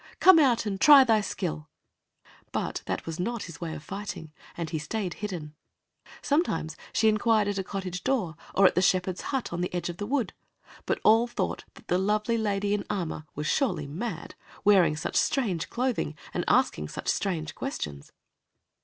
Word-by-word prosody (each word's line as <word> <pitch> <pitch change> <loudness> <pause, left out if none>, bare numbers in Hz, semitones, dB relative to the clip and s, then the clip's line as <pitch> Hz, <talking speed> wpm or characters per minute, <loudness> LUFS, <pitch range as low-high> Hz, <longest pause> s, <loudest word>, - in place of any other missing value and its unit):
Come 370 -3 +8
out 250 -7 +3
and 195 -2 -3
try 290 -3 +9
thy 225 -4 +3
skill!" 75 - -4 0.8
But - - -2
that - - -3
was 165 0 -5
not 235 +4 -2
his 170 -1 -10
way 165 -2 -4
of - - -9
fighting, 185 -3 -7 0.2
and 170 -2 -3
he 160 -1 -3
stayed 180 +4 -3
hidden. 175 -8 -6 0.7
Sometimes 165 - 0 0.2
she 220 - +2
inquired 215 0 +3
at 200 -1 -1
a - - -1
cottage 185 -2 -5
door 220 -12 0 0.2
or 195 - +5
at - - +5
a 180 - +3
shepherd's 185 -1 +1
hut 265 -9 -3
on 175 - -2
the 180 - -2
edge 175 - -2
of 175 - -6
the 205 - -4
wood, 265 -1 0 0.5
but - - 0
all 225 +2 +5
thought 240 - -3
that - - -16
the 180 - +2
lovely 210 +4 +1
lady 205 -1 0
in 205 - 0
armor 160 -5 -3
was 150 - -4
surely 220 - +1
mad, 170 +4 -5 0.3
wearing 195 -6 +5
such - - -4
strange 195 - +1
clothing 235 - -1 0.2
and - - -1
asking 75 0 +2
such - - -7
strange 160 -6 -1
questions. 75 - -5
195 Hz, 180 wpm, -27 LUFS, 165-225 Hz, 0.8 s, try